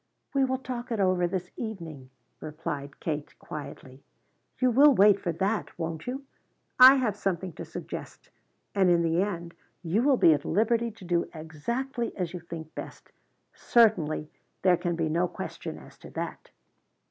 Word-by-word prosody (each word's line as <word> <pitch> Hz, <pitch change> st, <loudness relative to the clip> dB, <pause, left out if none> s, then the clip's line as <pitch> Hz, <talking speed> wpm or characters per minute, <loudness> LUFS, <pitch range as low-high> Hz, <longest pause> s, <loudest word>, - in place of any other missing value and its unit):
"We 275 Hz, -1 st, +3 dB
will 260 Hz, 0 st, 0 dB
talk 250 Hz, -1 st, -6 dB
it 225 Hz, -, -1 dB
over 185 Hz, -2 st, +2 dB
this 180 Hz, 0 st, -4 dB
evening," 165 Hz, -, -6 dB, 0.3 s
replied 145 Hz, -2 st, -6 dB
Kate 150 Hz, -2 st, -4 dB
quietly. 140 Hz, -2 st, -9 dB, 0.6 s
"You 255 Hz, -1 st, +3 dB
will 280 Hz, +3 st, +7 dB
wait 200 Hz, -1 st, +6 dB
for 175 Hz, -, -2 dB
that, 195 Hz, +6 st, -2 dB
won't 165 Hz, +1 st, -4 dB
you? 265 Hz, +3 st, -4 dB, 0.6 s
I 260 Hz, +2 st, +11 dB
have 250 Hz, -6 st, 0 dB
something 185 Hz, -2 st, -2 dB
to -, -, -7 dB
suggest. -, -, -8 dB, 0.4 s
And 195 Hz, -3 st, +3 dB
in 170 Hz, -1 st, +4 dB
the 165 Hz, +2 st, +2 dB
end 170 Hz, -4 st, -3 dB, 0.3 s
you 180 Hz, +7 st, +1 dB
will 270 Hz, 0 st, +4 dB
be 165 Hz, -, +6 dB
at 145 Hz, -1 st, -1 dB
liberty 230 Hz, +4 st, +1 dB
to 220 Hz, -4 st, -13 dB
do 175 Hz, -1 st, 0 dB
exactly 235 Hz, -, -4 dB
as 180 Hz, -3 st, -3 dB
you 180 Hz, -, -5 dB
think 165 Hz, -2 st, -9 dB
best. -, -, -9 dB, 0.4 s
Certainly 165 Hz, -10 st, +2 dB, 0.3 s
there 180 Hz, -1 st, +6 dB
can 175 Hz, 0 st, -2 dB
be 165 Hz, -1 st, 0 dB
no 170 Hz, +3 st, +1 dB
question -, -, -6 dB
as -, -, -15 dB
to -, -, -11 dB
that." -, -, -6 dB
180 Hz, 165 wpm, -28 LUFS, 160-230 Hz, 0.6 s, I